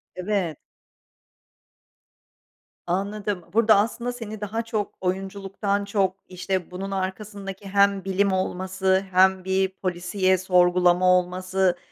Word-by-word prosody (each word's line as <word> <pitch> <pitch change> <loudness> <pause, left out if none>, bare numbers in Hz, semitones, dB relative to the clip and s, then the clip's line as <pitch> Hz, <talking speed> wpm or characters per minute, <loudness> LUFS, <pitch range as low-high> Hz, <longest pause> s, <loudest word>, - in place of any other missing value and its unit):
Evet. 185 -4 -2 2.3
Anladım. 200 0 -2
Burada 220 -1 +5
aslında 235 +4 0
seni 220 -3 -7
daha 220 +2 -2
çok 220 -3 -3
oyunculuktan 195 +2 -2
çok, 195 -2 0
işte, 185 -1 -3
bunun 195 +2 -5
arkasındaki 195 +1 -5
hem 200 -1 +3
bilim 195 +1 +1
olması 190 +1 0
hem 190 0 +4
bir 190 0 +1
polisiye, 185 +1 0
sorgulama 180 0 +3
olması 185 0 -1
190 Hz, 100 wpm, -24 LUFS, 185-200 Hz, 2.3 s, Burada